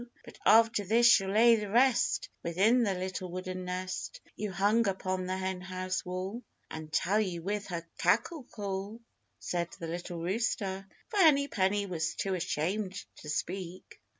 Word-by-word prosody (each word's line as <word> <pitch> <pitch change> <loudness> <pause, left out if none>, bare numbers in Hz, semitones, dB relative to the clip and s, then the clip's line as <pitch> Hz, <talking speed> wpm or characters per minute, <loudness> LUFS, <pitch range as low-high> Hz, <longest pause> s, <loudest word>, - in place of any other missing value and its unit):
But - - -13
after 225 -1 +5
this 225 +5 +3
she'll 195 -5 +6
lay 230 +3 +6
the 210 -2 -4
rest 245 +3 +3
Within 200 +9 +3
the 200 -5 +1
little 185 0 -4
wooden 185 +1 -5
nest 185 +1 -4 0.2
You 210 -1 -4
hung 205 +4 +2
upon 185 -1 -2
the 185 0 -2
Henhouse 185 0 -3
wall, 185 +6 -4 0.3
And 155 -1 -7
tell 185 +6 +2
you 180 -6 -2
with 205 +2 -2
her 170 -2 -5
cackle 270 +5 +1
call," 200 0 -5 0.4
said 170 -1 -2
the 165 - -5
little 175 +1 -5
rooster, 195 +1 -2 0.2
for 430 - -4
Henny 295 -7 +5
Penny 200 -2 +1
was 170 -3 -2
too 195 - -2
ashamed 185 +3 -1 0.2
to 150 - -10
speak. 180 +3 -5
190 Hz, 155 wpm, -30 LUFS, 180-215 Hz, 0.4 s, she'll